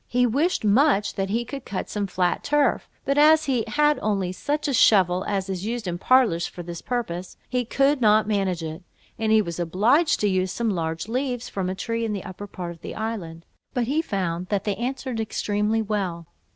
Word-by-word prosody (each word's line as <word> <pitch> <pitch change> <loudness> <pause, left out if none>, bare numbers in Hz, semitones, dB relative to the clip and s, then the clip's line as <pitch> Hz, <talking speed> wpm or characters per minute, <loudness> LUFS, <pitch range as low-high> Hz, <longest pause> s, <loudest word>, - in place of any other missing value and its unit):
He 250 +1 +2
wished 280 +4 +1
much 210 -2 +3
that 195 -1 -2
he 230 +4 0
could 275 +1 -7
cut 195 - -4
some 205 -1 -2
flat 180 -1 0
turf; 295 0 +1 0.2
but 275 +1 +2
as 310 +1 +6
he 255 -5 +1
had 295 0 +2
only 195 -4 0
such 295 +10 -2
a 280 - 0
shovel 185 -6 +4
as 195 -2 -1
is 190 -1 -4
used 225 -1 -3
in 175 0 -3
parlours 230 -8 +3
for 175 - -9
this 170 0 -7
purpose, 185 -8 -4
he 250 -1 -1
could 275 +3 +2
not 215 -1 +4
manage 195 -5 0
it; 160 +2 -6 0.4
and 220 -1 +1
he 220 -1 +5
was 170 -2 -5
obliged 220 - +2
to 210 - +3
use 185 -1 +1
some 230 +2 -1
large 165 -1 -3
leaves, 250 0 -2
from 190 -2 -2
a 185 - -3
tree 230 +3 -2
in 220 -2 -1
the 200 - -4
upper 190 +2 -8
part 180 -3 -6
of 170 -1 -13
the - - -7
island, 185 -7 -5 0.3
but 245 - +1
he 285 +7 +1
found 185 - -2
that 200 -1 -1
they 205 -2 -1
answered 255 0 -3
extremely 215 0 0
well. 190 -6 -2
210 Hz, 210 wpm, -24 LUFS, 185-245 Hz, 0.4 s, as